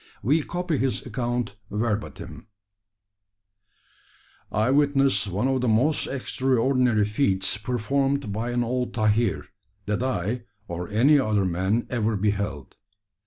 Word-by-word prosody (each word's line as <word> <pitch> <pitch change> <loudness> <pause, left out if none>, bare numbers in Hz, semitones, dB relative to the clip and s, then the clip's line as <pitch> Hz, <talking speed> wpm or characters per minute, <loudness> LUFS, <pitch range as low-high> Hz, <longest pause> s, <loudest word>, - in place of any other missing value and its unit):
We 145 +9 +3
copy 175 -1 -2
his 130 -1 -1
account 120 -4 -3
verbatim: 105 0 -4 2.0
"I 110 +5 +1
witnessed 135 -7 +3
one 100 +7 -1
of 135 -1 +1
the 125 - 0
most 125 +8 +2
extraordinary 130 -4 +1
feats 100 -4 +1
performed 125 +2 -1
by 115 +3 -2
an 120 0 0
old 125 +1 -2
tahir, 110 -2 +1 0.4
that 105 +2 -1
I, 120 -1 -2 0.2
or 85 +1 -5
any 130 +8 +4
other 105 -6 +1
man, 95 +6 0
ever 110 -3 0
beheld. 100 -7 -2
120 Hz, 120 wpm, -25 LUFS, 105-130 Hz, 2.0 s, any